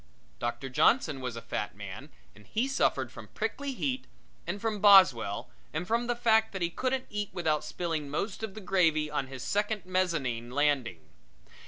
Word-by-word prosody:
Doctor 120 +2 -3
Johnson 140 - +3
was 125 -2 -4
a 115 - -7
fat - - -3
man - - -8 0.2
and 105 +1 -18
he 230 +5 0
suffered 275 - +1
from - - -10
prickly 280 -1 -2
heat, 260 0 -2 0.4
and 185 +4 -2
from 220 -1 -2
Boswell, 170 - +6 0.2
and 180 - -2
from 230 +4 0
the 240 - +1
fact 220 -2 +3
that 190 -2 -2
he 170 - 0
couldn't 260 +5 -1
eat 205 -1 -2
without 160 -4 0
spilling 155 -1 -3
most 190 +9 -3
of 220 -3 -5
the 215 - -7
gravy 160 -5 +2
on 140 -3 -1
his 130 -1 -7
second 205 -1 -1
mezzanine 165 -11 -1
landing. 130 - +1
180 Hz, 175 wpm, -30 LUFS, 140-220 Hz, 0.4 s, Boswell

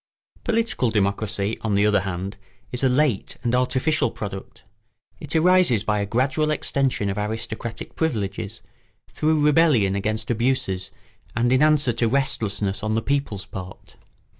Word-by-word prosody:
] - - -33
Political 225 - +1
democracy, 105 0 -1
on 110 -3 0
the 100 +1 +3
other 105 -1 +4
hand, 95 +1 -4 0.3
is 125 +1 -3
a 130 - +4
late 130 -4 +1
and 120 -1 0
artificial 130 +2 +2
product. 100 -3 -8 0.6
It 150 +1 -5
arises 165 - +4
by 105 -1 0
a 100 - -2
gradual 135 +7 +1
extension 135 -7 0
of 100 - -3
aristocratic 110 +2 -5
privileges, 105 -7 -3 0.5
through 155 0 +1
rebellion 145 -10 +4
against 110 +3 -1
abuses, 110 -6 0 0.5
and 120 +1 +2
in 130 - +3
answer 150 -4 +4
to 115 - +1
restlessness 105 -6 0
on 110 +1 -1
the 115 - 0
people's 140 -8 -1
part. 95 -1 -10
115 Hz, 145 wpm, -23 LUFS, 100-140 Hz, 0.6 s, other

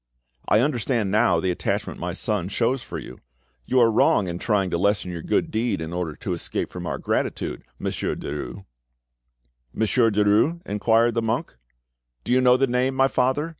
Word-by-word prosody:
"I 110 - +4
understand 120 -6 0
now 105 -5 +3
the 90 +2 0
attachment 85 - -3
my - - -3
son 100 -4 -2
shows 120 +5 0
for - - -7
you. 65 - -9 0.5
You 130 - +3
are 115 -2 +5
wrong 105 -2 +3
in 85 0 -4
trying 100 -4 0
to 85 - +1
lessen 100 -1 +1
your 85 -1 -5
good - - 0
deed 110 -3 0
in 80 +1 -5
order 85 -4 -3
to - - -4
escape - - -3
from 90 -1 -6
our 80 - -2
gratitude, - - -2
Monsieur - - -2
Derues." 70 -4 -6 1.1
"Monsieur 115 - +2
Derues?" 105 +10 +2
inquired 115 +3 +2
the 115 - 0
monk. 110 -10 -2 0.7
"Do - - 0
you 130 - +4
know 125 0 +5
the 135 - +3
name, 130 +1 0
my 135 0 +4
father?" 130 +6 +1
110 Hz, 180 wpm, -24 LUFS, 90-125 Hz, 1.1 s, are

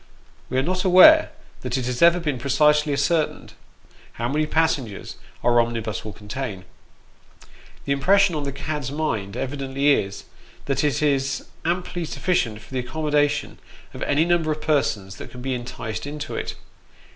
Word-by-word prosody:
We 130 - -1
are 130 - +2
not 185 +4 -1
aware 200 - +8 0.3
that 125 0 -2
it 130 - -2
has 125 -1 -3
ever 170 +1 +6
been 150 -7 -2
precisely 150 +3 +3
ascertained, 145 +3 0 0.6
how 120 +1 -3
many 155 +3 0
passengers 145 -10 -1 0.3
our 120 -1 +5
omnibus 115 -4 -3
will 110 - -6
contain. 105 -2 -6 1.2
The 140 - -2
impression 190 +7 +4
on 150 - -2
the 140 -1 -3
cad's 145 -1 -4
mind, 115 -9 -2
evidently 140 +1 0
is, 100 -7 0 0.4
that 140 +1 0
it 145 -1 +1
is 135 -2 0 0.2
amply 175 0 -2
sufficient 120 - -1
for 130 - -15
the 130 - 0
accommoda 145 +2 +1
tion - - -5 0.3
of - - -9
any 145 +3 +2
number 170 -2 +1
of 155 - -2
persons 105 -11 0
that - - -9
can 125 0 -10
be 130 0 -1
enticed 120 0 -5
into 150 0 -6
it. - - -4
140 Hz, 160 wpm, -23 LUFS, 125-155 Hz, 1.2 s, aware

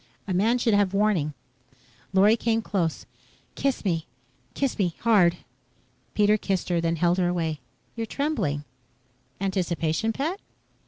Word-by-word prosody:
"A 190 - -1
man 220 +7 +3
should 235 -2 +1
have 200 -1 +2
warning." 190 -8 +1 0.8
Lorry 200 +3 +5
came 225 -1 0
close. 170 -8 -1 0.5
"Kiss 275 -5 -1
me. 165 -4 0 0.5
Kiss 275 -5 -1
me 180 -4 +1
hard." 190 -7 +4 0.8
Pete 210 0 +3
kissed 190 -3 -1
her, 170 -1 +1
then 165 0 0
held 175 +2 +2
her 180 - +2
away. 165 -4 -1 0.4
"You're 225 -1 -3
trembling. 215 - -1 0.8
Anticipation, 185 0 0
pet?" 310 - -2
195 Hz, 130 wpm, -26 LUFS, 170-225 Hz, 0.8 s, Lorry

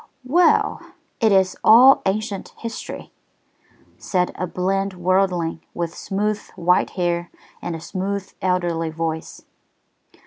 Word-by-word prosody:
"Well, 340 +8 +3 0.4
it 225 -4 +3
is 190 -1 +3
all 250 +5 +8
ancient 200 0 -3
history," 230 -1 -7 0.9
said 180 -2 0
a 185 - -4
bland 195 +2 -1
worldling, 180 -2 0
with 170 -1 -3
smooth, 210 +2 -2 0.2
white 180 +1 +2
hair 175 -1 -1 0.3
and 175 -1 -4
a - - -6
smooth, 195 +3 -4
elderly 175 -3 0
voice. 160 0 -4
185 Hz, 110 wpm, -22 LUFS, 175-200 Hz, 0.9 s, all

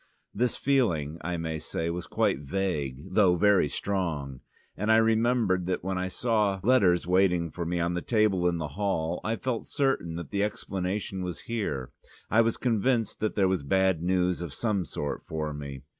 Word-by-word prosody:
This 120 +2 0
feeling, 85 - +1
I 90 -1 -2
may 80 -1 -3
say, 80 +2 -3
was 90 0 -5
quite - - +1
vague, 75 -4 -3
though 95 -3 +5
very 100 -4 +4
strong, 80 -11 -2 0.4
and 105 +3 0
I 110 - +7
remember 115 -3 +3
that 90 0 -2
when 95 0 -2
I 95 - -1
saw 105 -1 0
letters 95 -8 +4
waiting 90 -2 +2
for 85 -2 -4
me 85 0 -1
on 85 +1 0
the 90 - -2
table 105 -5 +2
in 85 -1 +1
the 75 -3 -3
hall 90 -1 -1
I 110 - 0
felt 120 -1 -3
certain 135 - 0
that 85 -3 -7
the 100 0 +1
explanation 95 -1 -3
was 90 -2 -5
here: 100 - -3 0.4
I 110 - +6
was 115 0 +1
convinced 120 -1 +1
that 110 0 -1
there 95 -2 +3
was 95 -3 0
bad 95 +3 +2
news 90 0 +1
of 85 -5 -5
some 105 -6 0
sort 75 -1 -4
for 75 -1 -3
me. 70 -2 -7
95 Hz, 185 wpm, -28 LUFS, 85-105 Hz, 0.4 s, I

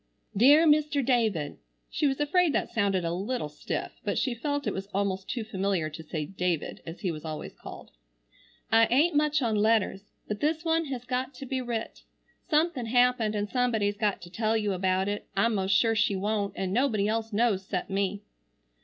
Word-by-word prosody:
"DEAR 285 +10 +6
MR. 295 -3 +3
DAVID:" 220 - +1 0.3
(she 300 - 0
was 270 0 -1
afraid 330 +3 +3
that - - -1
sounded 195 -5 +1
a 165 - -1
little 200 0 -3
stiff, 150 - -5
but - - -1
she 255 - 0
felt 285 +4 -2
it 210 - -1
was 195 +1 -5
almost 195 -1 -1
too 235 - -2
familiar 195 -6 -1
to 155 - -8
say 155 -1 -4
"David" 180 -2 -2
as 165 +4 -8
he 185 -5 0
was 155 -2 -7
always 155 -1 -6
called.) - - -11 0.8
"I 225 0 +6
ain't 295 +7 +3
much 300 -1 +2
on 225 -2 +1
letters, 210 -2 +2 0.2
but 210 -1 -3
this 315 +2 0
one 325 0 +2
has 255 -4 -5
got 255 +1 -2
to 270 - -8
be 260 0 -2
writ. 235 -2 -4 0.5
Something 305 -6 +1
happened 245 -2 +3
and 205 0 -1
somebody's 220 -4 +1
got 210 -4 -1
to 175 - -11
tell 220 +2 +1
you 210 -2 0
about 185 +1 +1
it. 205 0 -3
I'm 230 +4 +3
most 195 -1 +1
sure 225 +2 +4
she 210 -2 +2
wont, 200 0 -1
and 190 -1 -2
nobody 225 -4 +2
else 225 +1 -1
knows 210 -2 +1
cept 185 0 -4
me. 200 +1 -1
220 Hz, 195 wpm, -28 LUFS, 195-255 Hz, 0.8 s, DEAR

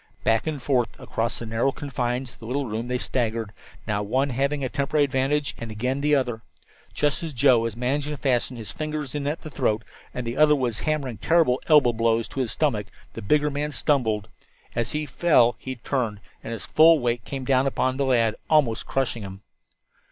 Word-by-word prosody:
Back 115 +6 +2
and 155 -2 -2
forth 125 -3 0
across 115 +1 -2
the 120 - -6
narrow 115 +4 +1
confines 125 -2 -3
of - - -20
the 115 - -9
little 140 +3 -1
room 115 +1 -4
they 125 0 0
staggered, 115 -4 -2 0.3
now 105 -2 -1
one 130 +7 0
having 140 +3 0
a - - +1
temporary 140 +3 +1
advantage, 140 +1 0
and 115 - -6
again 125 +6 -2
the 150 0 +3
other. 120 -4 -1 0.5
Just 145 -1 +1
as 165 -3 -5
Joe 130 -1 +5
was 115 -1 -2
managing 140 +4 -1
to 150 - -4
fasten 125 -2 0
his 110 -2 -7
fingers 155 -3 -4
in 145 -1 -2
at 150 +3 -2
the 155 - -9
throat, 110 -3 0 0.3
and 125 - -5
the 120 +3 -4
other 150 0 +6
was 125 -5 -1
hammering 145 -7 -2
terrible 160 -6 +3
elbow 145 -6 +6
blows 115 0 +1
into - - -7
his 125 -4 -1
stomach, 115 -10 0 0.3
the 115 - -7
bigger 150 +7 +2
man 145 +1 -2
stumbled. 115 -9 0 0.5
As 115 -1 0
he 150 0 -1
fell 130 -5 +3
he 130 0 -5
turned, 120 -4 -2 0.2
and - - -6
his 115 -5 -6
full 160 +1 +6
weight 120 -4 -1
came 135 +2 -5
down 135 0 +3
upon 130 -1 0
the 140 - +1
lad, 115 -4 +2
almost 145 -8 +2
crushing 130 -4 -1
him. 95 0 -9
130 Hz, 205 wpm, -25 LUFS, 115-145 Hz, 0.5 s, other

